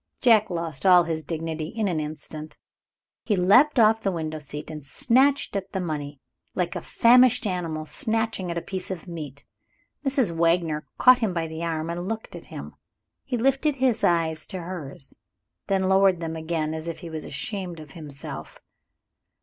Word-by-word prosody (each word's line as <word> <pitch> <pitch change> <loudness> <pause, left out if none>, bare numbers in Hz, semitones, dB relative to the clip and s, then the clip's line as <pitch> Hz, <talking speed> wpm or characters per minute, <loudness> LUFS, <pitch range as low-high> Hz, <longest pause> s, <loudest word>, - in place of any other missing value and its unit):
Jack 225 -4 +5
lost 165 -5 -4
all 180 -2 +7
his 160 -1 -3
dignity 160 0 -4
in 220 +3 -2
an 170 -4 0
instant. 155 0 -7 0.7
He 210 - +1
leapt 245 +12 +5
off 220 -1 +5
the 195 - 0
window 155 -3 -4
seat 150 +1 -7
and 150 -2 -7
snatched 260 - +2
at 195 -1 -4
the 190 - -1
money, 150 -5 -4 0.4
like 175 -1 -1
a - - -3
famished 250 +1 +5
animal 165 -5 -2
snatching 225 - -1
at 170 - -3
a 170 - -3
piece 190 -2 -5
of 185 -2 -6
meat. 150 -5 -8 0.6
Mrs. 265 - +2
Wagner 165 -3 +1
caught 255 0 +7
him 215 -7 -1
by 165 -1 0
the 160 +1 -6
arm, 165 0 -2
and 175 +2 -4
looked 225 0 -5
at - - -9
him. - - -8 0.5
He 255 -3 -2
lifted 270 +4 +2
his 250 -4 +1
eyes 160 -3 +1
to 185 -3 -5
hers, 165 -6 -8 0.5
then 195 -1 +1
lowered 190 -1 +4
them 165 -1 -4
again 160 -1 -2
as 160 +1 -5
if 165 - -5
he 170 - -8
was 155 -1 -5
ashamed 180 +2 -4
of 155 -3 -11
himself. 145 -3 -8
170 Hz, 175 wpm, -25 LUFS, 155-210 Hz, 0.7 s, all